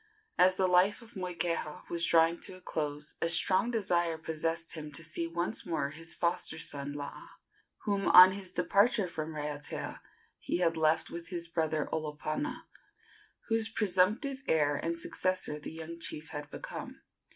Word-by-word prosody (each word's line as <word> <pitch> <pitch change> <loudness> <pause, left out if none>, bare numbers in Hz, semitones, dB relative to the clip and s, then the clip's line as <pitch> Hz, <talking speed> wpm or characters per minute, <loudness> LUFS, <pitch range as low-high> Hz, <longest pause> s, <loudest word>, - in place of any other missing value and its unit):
As 185 +1 +6
the 190 - +2
life 185 +5 +3
of 230 - -16
Moikeha 175 -4 -2
was 170 -1 -1
drawing 165 0 +4
to 185 - -6
a - - -12
close 150 -3 -3
a 165 - +2
strong 185 +6 +4
desire 175 -7 +1
possessed 165 +1 -3
him 150 -2 -7
to 160 - -3
see 165 +1 -3
once 170 +5 -2
more 150 -6 -2
his 165 +1 -1
foster 170 -2 0
son 140 -2 -2
Laa, 145 0 -7 0.5
whom, 200 -2 0
on 180 +1 +10
his 190 -1 -5
departure 210 +3 +3
from 155 -2 -5
Raiatea, 150 0 -4 0.4
he - - -2
had 170 -2 +2
left 160 0 +2
with 170 0 -7
his 170 -2 -4
brother 160 -2 -1
Olopana, 155 - -3 0.9
whose 225 0 +1
presumptive 215 +7 +1
heir 145 -2 +3
and 170 +3 -2
successor 185 -2 -1
the - - -7
young 165 +1 -8
chief 160 -1 -5
had 145 -1 -6
become. - - -8
170 Hz, 160 wpm, -31 LUFS, 155-185 Hz, 0.9 s, on